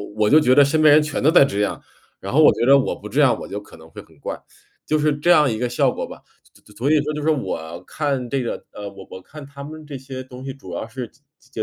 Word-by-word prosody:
我 110 Hz, -1 st, +2 dB
就 150 Hz, +8 st, +6 dB
觉 130 Hz, -4 st, +3 dB
得 145 Hz, -, +7 dB
身 155 Hz, +3 st, +1 dB
边 155 Hz, -, +7 dB
人 155 Hz, -, +5 dB
全 150 Hz, -2 st, -3 dB
都 150 Hz, -, +4 dB
在 165 Hz, -4 st, +6 dB
这 120 Hz, -7 st, -3 dB
样， 105 Hz, -, -2 dB, 0.4 s
然 100 Hz, -, -7 dB
后 155 Hz, -, +5 dB
我 -, -, +8 dB
觉 -, -, 0 dB
得 135 Hz, +2 st, +7 dB
我 -, -, -2 dB
不 105 Hz, -, -9 dB
这 130 Hz, +8 st, +1 dB
样， 135 Hz, -4 st, +3 dB
我 -, -, -8 dB
就 105 Hz, +1 st, -6 dB
可 -, -, -16 dB
能 80 Hz, 0 st, -15 dB
会 -, -, -10 dB
很 -, -, -22 dB
怪， -, -, -6 dB, 0.5 s
就 155 Hz, -, +2 dB
是 150 Hz, -1 st, +1 dB
这 170 Hz, +4 st, -1 dB
样 150 Hz, -6 st, +5 dB
一 110 Hz, -, -3 dB
个 125 Hz, 0 st, -1 dB
效 120 Hz, -, +1 dB
果 -, -, -5 dB
吧。 -, -, -12 dB, 0.2 s
所 -, -, -26 dB
所 105 Hz, -, -19 dB
所 130 Hz, +7 st, 0 dB
以 155 Hz, -, +4 dB
说 150 Hz, +1 st, -3 dB
就 150 Hz, -, -4 dB
说 155 Hz, +2 st, +2 dB
我 85 Hz, -, -6 dB
看 140 Hz, -5 st, -3 dB
这 135 Hz, +2 st, -1 dB
个， 120 Hz, -, -5 dB
呃， 105 Hz, -1 st, -8 dB
我 95 Hz, -1 st, -13 dB
我 95 Hz, -, -9 dB
看 150 Hz, +8 st, -12 dB
他 140 Hz, 0 st, -11 dB
们 155 Hz, +1 st, -10 dB
这 145 Hz, -, -8 dB
些 130 Hz, 0 st, -8 dB
东 130 Hz, 0 st, -12 dB
西 135 Hz, -, -5 dB
主 95 Hz, -10 st, -11 dB
要 110 Hz, -, -5 dB
是 125 Hz, +1 st, -6 dB
接 -, -, -30 dB, 0.2 s
接 -, -, -26 dB
135 Hz, 325 characters per minute, -21 LUFS, 110-150 Hz, 0.5 s, 我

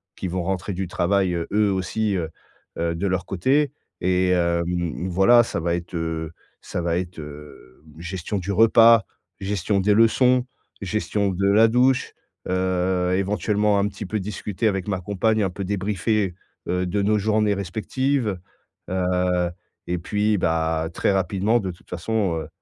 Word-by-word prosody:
qui 95 Hz, -, -4 dB
vont 90 Hz, 0 st, -2 dB
rentrer 95 Hz, +2 st, -2 dB
du 95 Hz, 0 st, -3 dB
travail, 90 Hz, +1 st, +1 dB
heu, 85 Hz, -1 st, -2 dB
eux 105 Hz, -1 st, +3 dB
aussi, 100 Hz, +2 st, -1 dB
heu 80 Hz, -3 st, -2 dB, 0.5 s
heu, 85 Hz, 0 st, -1 dB
de 100 Hz, +4 st, -1 dB
leur 95 Hz, -1 st, -1 dB
côté. 135 Hz, -, +1 dB, 0.3 s
Et 90 Hz, 0 st, +1 dB
hem, 85 Hz, -1 st, +2 dB
mmh, 85 Hz, 0 st, -2 dB
voilà, 120 Hz, +7 st, +5 dB
ça 110 Hz, -, -3 dB
va 85 Hz, +1 st, 0 dB
être 85 Hz, 0 st, -6 dB
heu, 80 Hz, -1 st, -3 dB, 0.3 s
ça -, -, -5 dB
va 85 Hz, 0 st, 0 dB
être, 90 Hz, -2 st, -5 dB
hem, 75 Hz, -3 st, -12 dB
gestion 90 Hz, +3 st, -4 dB
du 95 Hz, +2 st, -3 dB
repas, 115 Hz, 0 st, +6 dB, 0.4 s
gestion 100 Hz, 0 st, 0 dB
des 105 Hz, +2 st, +3 dB
leçons, 125 Hz, +3 st, +4 dB, 0.4 s
gestion 100 Hz, 0 st, -1 dB
de 100 Hz, +2 st, +1 dB
la 110 Hz, +3 st, +6 dB
douche, 130 Hz, +2 st, +2 dB, 0.4 s
heu, 90 Hz, 0 st, 0 dB
éventuellement 105 Hz, +2 st, +1 dB
un 100 Hz, -, +2 dB
petit 105 Hz, -, -7 dB
peu 110 Hz, +3 st, -2 dB
discuter 105 Hz, +2 st, -3 dB
avec 95 Hz, -1 st, -1 dB
ma 95 Hz, -2 st, -1 dB
compagne, 105 Hz, +4 st, 0 dB
un 95 Hz, -, +1 dB
peu 95 Hz, +2 st, -6 dB
débriefer, 100 Hz, 0 st, -1 dB, 0.3 s
heu, 90 Hz, +1 st, 0 dB
de 100 Hz, +3 st, -1 dB
nos 105 Hz, +1 st, +2 dB
journées 105 Hz, 0 st, +2 dB
respectives. 110 Hz, +4 st, -1 dB, 0.5 s
Heu 90 Hz, -1 st, 0 dB, 0.4 s
et 90 Hz, 0 st, -1 dB
puis, 105 Hz, +4 st, 0 dB
bah, 80 Hz, -1 st, 0 dB
très -, -, +1 dB
rapidement 95 Hz, +5 st, +1 dB
de 95 Hz, -3 st, -3 dB
toute 85 Hz, -, -18 dB
façon, 95 Hz, 0 st, -1 dB
heu, 80 Hz, -, -8 dB
95 Hz, 165 wpm, -23 LUFS, 90-105 Hz, 0.5 s, repas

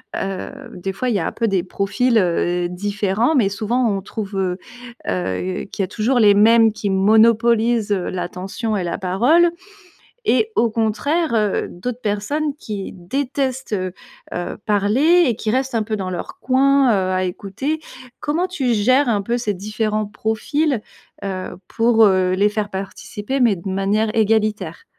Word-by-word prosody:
heu, 195 Hz, -1 st, -3 dB, 0.2 s
des 195 Hz, +2 st, -4 dB
fois, 250 Hz, +5 st, -2 dB
il 230 Hz, -, 0 dB
y 200 Hz, -, +2 dB
a 165 Hz, -, -1 dB
un -, -, -2 dB
peu 230 Hz, -, -1 dB
des 195 Hz, -3 st, +1 dB
profils, 225 Hz, +6 st, 0 dB
heu, 175 Hz, -1 st, +1 dB
différents, 205 Hz, -, 0 dB
mais, 210 Hz, -7 st, +3 dB
souvent, 230 Hz, +4 st, 0 dB
on 195 Hz, -2 st, -1 dB
trouve, 205 Hz, 0 st, -6 dB
heu 185 Hz, -1 st, -1 dB, 0.5 s
heu, 95 Hz, -, -2 dB
qu'il 195 Hz, -, -2 dB
y -, -, +1 dB
a -, -, -10 dB
toujours 235 Hz, +5 st, 0 dB
les 205 Hz, -2 st, +6 dB
mêmes 225 Hz, +1 st, +5 dB
qui 205 Hz, -, -3 dB
monopolisent, 225 Hz, +2 st, +3 dB
heu, 190 Hz, -3 st, 0 dB
l'attention 185 Hz, +5 st, -4 dB
et 190 Hz, -, -1 dB
la 170 Hz, -, -2 dB
parole. 245 Hz, -, +3 dB, 0.8 s
Et 440 Hz, +1 st, +2 dB
au 235 Hz, -, +4 dB
contraire, 235 Hz, +8 st, 0 dB
heu, 210 Hz, -2 st, +1 dB
d'autres 245 Hz, +7 st, -6 dB
personnes 275 Hz, +9 st, -1 dB
qui 205 Hz, -3 st, -5 dB
détestent, 260 Hz, +6 st, -3 dB
heu 185 Hz, -2 st, -2 dB, 0.4 s
heu, 175 Hz, 0 st, -4 dB
parler 240 Hz, -, +3 dB
et 235 Hz, -, +1 dB
qui 215 Hz, -, -2 dB
restent 260 Hz, +1 st, -1 dB
un 220 Hz, -, +1 dB
peu 215 Hz, 0 st, -3 dB
dans 190 Hz, -2 st, -4 dB
leur 185 Hz, -, -6 dB
coin, 270 Hz, -2 st, +3 dB
heu, 190 Hz, -2 st, +1 dB
à 185 Hz, 0 st, +1 dB
écouter. 205 Hz, -, -3 dB, 0.4 s
Comment 330 Hz, +5 st, -1 dB
tu 265 Hz, -10 st, -1 dB
gères, 255 Hz, +6 st, +3 dB
un 205 Hz, -3 st, +1 dB
peu, 235 Hz, +4 st, -1 dB
ces 215 Hz, -4 st, -1 dB
différents 215 Hz, +2 st, -2 dB
profils, 225 Hz, +5 st, -1 dB, 0.4 s
heu, 190 Hz, -2 st, -4 dB
pour, 225 Hz, -1 st, +4 dB
heu, 185 Hz, -2 st, +3 dB
les 200 Hz, +2 st, +3 dB
faire 210 Hz, 0 st, -2 dB
participer 205 Hz, +5 st, -5 dB
mais 235 Hz, -6 st, +4 dB
de 185 Hz, +3 st, -7 dB
manière 205 Hz, +3 st, 0 dB
égalitaire? 215 Hz, -5 st, 0 dB
215 Hz, 170 wpm, -20 LUFS, 195-240 Hz, 0.8 s, les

